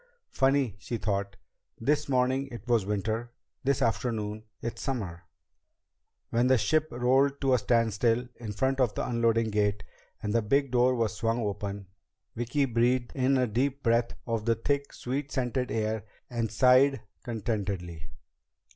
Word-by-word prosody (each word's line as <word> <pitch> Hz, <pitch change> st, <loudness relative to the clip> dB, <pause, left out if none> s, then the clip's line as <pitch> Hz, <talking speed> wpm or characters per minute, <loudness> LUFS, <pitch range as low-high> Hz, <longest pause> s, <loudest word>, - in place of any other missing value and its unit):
Funny, 135 Hz, -5 st, +2 dB
she 115 Hz, +4 st, -4 dB
thought, 100 Hz, -2 st, -2 dB, 0.4 s
this 145 Hz, +5 st, +1 dB
morning 130 Hz, +1 st, +2 dB
it 120 Hz, -3 st, -10 dB
was 115 Hz, -5 st, +2 dB
winter, 110 Hz, +3 st, -2 dB, 0.3 s
this 135 Hz, 0 st, +1 dB
afternoon 110 Hz, -2 st, -1 dB, 0.2 s
it's 115 Hz, -, -5 dB
summer. 95 Hz, -, -4 dB, 1.1 s
When 120 Hz, +2 st, +3 dB
the 130 Hz, 0 st, +5 dB
ship 155 Hz, +8 st, +2 dB
rolled 135 Hz, +2 st, +2 dB
to 135 Hz, -2 st, +3 dB
a 125 Hz, -, +4 dB
standstill 115 Hz, +1 st, +2 dB
in 115 Hz, -3 st, -6 dB
front 130 Hz, +6 st, 0 dB
of 120 Hz, -5 st, +2 dB
the -, -, -2 dB
unloading 115 Hz, -2 st, +2 dB
gate 105 Hz, -1 st, +1 dB, 0.4 s
and 105 Hz, 0 st, -1 dB
the 115 Hz, -, +3 dB
big 135 Hz, +5 st, +1 dB
door 125 Hz, +1 st, +4 dB
was 115 Hz, -3 st, 0 dB
swung 115 Hz, +2 st, 0 dB
open, 100 Hz, -1 st, -3 dB, 0.5 s
Vicki 125 Hz, +5 st, 0 dB
breathed 120 Hz, 0 st, +1 dB
in 135 Hz, 0 st, +2 dB
a 130 Hz, -, +3 dB
deep 130 Hz, +5 st, -1 dB
breath 115 Hz, 0 st, +2 dB
of 115 Hz, -3 st, -2 dB
the 115 Hz, -1 st, +3 dB
thick, 140 Hz, +5 st, -1 dB
sweet 135 Hz, +3 st, -4 dB
scented 125 Hz, -1 st, -1 dB
air 110 Hz, -1 st, -1 dB, 0.3 s
and 115 Hz, -3 st, -1 dB
sighed 130 Hz, +4 st, +5 dB, 0.2 s
contentedly. 100 Hz, -, -3 dB
120 Hz, 150 wpm, -28 LUFS, 110-130 Hz, 1.1 s, the